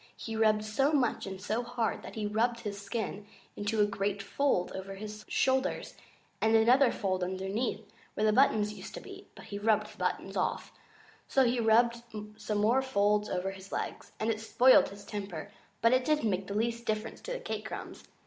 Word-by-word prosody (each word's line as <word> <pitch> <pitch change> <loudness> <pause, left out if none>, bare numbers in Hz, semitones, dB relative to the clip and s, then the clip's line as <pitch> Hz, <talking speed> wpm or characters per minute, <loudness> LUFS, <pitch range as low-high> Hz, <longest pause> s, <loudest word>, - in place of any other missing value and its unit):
He 225 - -5
rubbed 215 -1 +3
so 270 +8 +1
much 250 -8 +1
and 190 -1 -6
so 215 +4 -1
hard 240 -2 -2
that - - -10
he 215 -1 -2
rubbed 230 +3 0
his 205 -2 -5
skin 205 -1 -4 0.3
into 205 +1 0
a - - +6
great 200 0 -2
fold 265 -5 +1
over 195 +1 -6
his 210 +1 -7
shoulders, 260 0 +1 0.5
and 220 0 +4
another 245 +4 +5
fold 185 -3 -1
underneath, 190 +6 -2 0.3
where 215 - +1
the 215 - +4
buttons 215 -4 +3
used - - -9
to - - -5
be - - -11
(but - - -12
he 200 - -6
rubbed 215 0 +1
the - - -20
buttons - - -2
off), - - -1 0.6
and 265 -2 +6
he 240 +1 +1
rubbed 235 +1 +4 0.3
some 210 -1 -3
more 225 +6 +3
folds 210 -4 +2
over 185 +1 -1
his 190 0 -11
legs. - - -4
And 220 +1 +1
it 215 -1 -3
spoiled 245 +3 +5
his 200 +1 -11
temper, 195 -7 -6 0.3
but 230 +2 +6
it 255 0 +3
didn't 300 -7 +2
make 190 +1 -2
the 200 - -4
least 235 +2 -1
difference 215 -1 -3
to - - -6
the - - -4
cake - - -5
crumbs. - - -7
215 Hz, 195 wpm, -31 LUFS, 200-235 Hz, 0.6 s, a